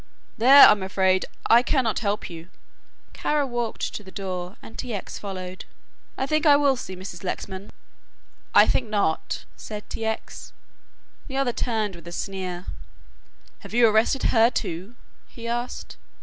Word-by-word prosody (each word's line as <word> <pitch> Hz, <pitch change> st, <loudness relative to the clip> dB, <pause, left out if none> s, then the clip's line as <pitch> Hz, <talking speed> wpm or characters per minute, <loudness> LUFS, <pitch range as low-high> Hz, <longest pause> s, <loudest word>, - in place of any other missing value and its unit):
"There, 265 Hz, +5 st, +9 dB
I'm 210 Hz, -, +4 dB
afraid 190 Hz, -1 st, +1 dB, 0.2 s
I 235 Hz, +1 st, +6 dB
cannot 250 Hz, -4 st, +1 dB
help 205 Hz, -2 st, -2 dB
you." 170 Hz, 0 st, -10 dB, 0.6 s
Kara 295 Hz, -1 st, 0 dB
walked 240 Hz, -3 st, -3 dB
to 210 Hz, -, -6 dB
the 190 Hz, -, -12 dB
door 185 Hz, -1 st, -5 dB
and 225 Hz, -, -13 dB
T. 240 Hz, -4 st, -4 dB
X. 195 Hz, -, -6 dB
followed. 185 Hz, -2 st, -7 dB, 0.5 s
"I 265 Hz, -, 0 dB
think 305 Hz, +2 st, 0 dB
I 290 Hz, -, +8 dB
will 285 Hz, -2 st, +3 dB
see 190 Hz, -6 st, -7 dB
Mrs. 185 Hz, -1 st, -9 dB
Lexman." 190 Hz, +1 st, -5 dB, 0.8 s
"I -, -, +9 dB
think 240 Hz, -4 st, 0 dB
not," 200 Hz, -7 st, -1 dB
said 210 Hz, -1 st, -8 dB
T. 225 Hz, -, -4 dB
X. 220 Hz, 0 st, -5 dB, 0.7 s
The 270 Hz, -, -5 dB
other 265 Hz, -3 st, +1 dB
turned 215 Hz, -6 st, -1 dB
with 170 Hz, 0 st, -13 dB
a -, -, -7 dB
sneer. 185 Hz, -1 st, -5 dB, 0.9 s
"Have -, -, -9 dB
you 240 Hz, -1 st, +6 dB
arrested 220 Hz, +5 st, +2 dB
her, 230 Hz, 0 st, +6 dB
too?" 190 Hz, 0 st, -4 dB, 0.3 s
he 235 Hz, -1 st, -9 dB
asked. 240 Hz, +1 st, -4 dB
215 Hz, 155 wpm, -24 LUFS, 190-240 Hz, 0.9 s, There